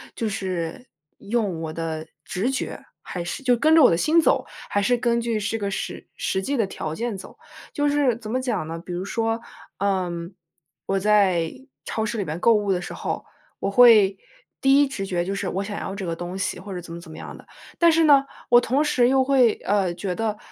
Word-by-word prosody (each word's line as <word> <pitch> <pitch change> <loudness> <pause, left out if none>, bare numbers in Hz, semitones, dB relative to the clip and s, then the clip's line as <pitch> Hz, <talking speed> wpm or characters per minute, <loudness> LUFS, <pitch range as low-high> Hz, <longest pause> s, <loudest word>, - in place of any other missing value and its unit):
就 225 - -2
是 185 +3 -4 0.3
用 200 -7 -1
我 160 -1 -4
的 160 -1 -4 0.2
直 220 +9 -1
觉， 270 - -4 0.2
还 175 -2 -5
是 220 +10 -5
就 250 -2 +4
跟 310 +7 +3
着 320 - +7
我 - - +8
的 165 - +3
心 320 - +3
走， - - +2 0.2
还 205 - +1
是 245 +4 +2
根 235 0 +1
据 230 -2 -1
这个 205 -1 -2
实 - - -5
实 190 - -1
际 275 +6 -2
的 220 - +1
条 155 -4 -5
件 230 +1 -3
走。 - - -12 0.4
就 290 0 +1
是 285 -5 +2
怎 225 -3 -9
么 255 +3 0
讲 240 -11 -2
呢， 165 +1 -5
比 175 +1 -9
如 180 - -3
说， 225 +1 -1 0.4
嗯， 185 -2 -2 0.5
我 195 0 0
在 190 -5 +3 0.3
超 220 0 -2
市 230 +2 -3
里 200 - -1
面 155 +2 -4
购 235 - +6
物 205 -2 +1
的 180 - -1
时 - - -7
候， - - -4 0.3
我 195 - -1
会 210 -4 +7 0.4
第 270 +1 +5
一 285 - +3
直 195 -8 -4
觉 175 -2 -1
就 195 - -2
是 195 -1 -3
我 195 +2 -2
想 205 0 -5
要 195 - -5
这 195 -2 -5
个 165 - -2
东 175 +2 -6
西 190 - -2
或 200 +2 -9
者 180 - -4
怎 170 -1 -10
么 170 - -7
怎 170 - -13
么 - - -10
样 - - -8
的。 - - -16 0.3
但 340 -1 +6
是 330 +1 +3
呢， 285 -3 +6 0.3
我 240 0 +7
同 270 +5 +1
时 255 -5 +3
又 265 0 +4
会， 255 -5 +4
呃， 195 -3 +2
觉 185 0 -3
得， 215 0 -2
205 Hz, 245 characters per minute, -24 LUFS, 180-245 Hz, 0.5 s, 我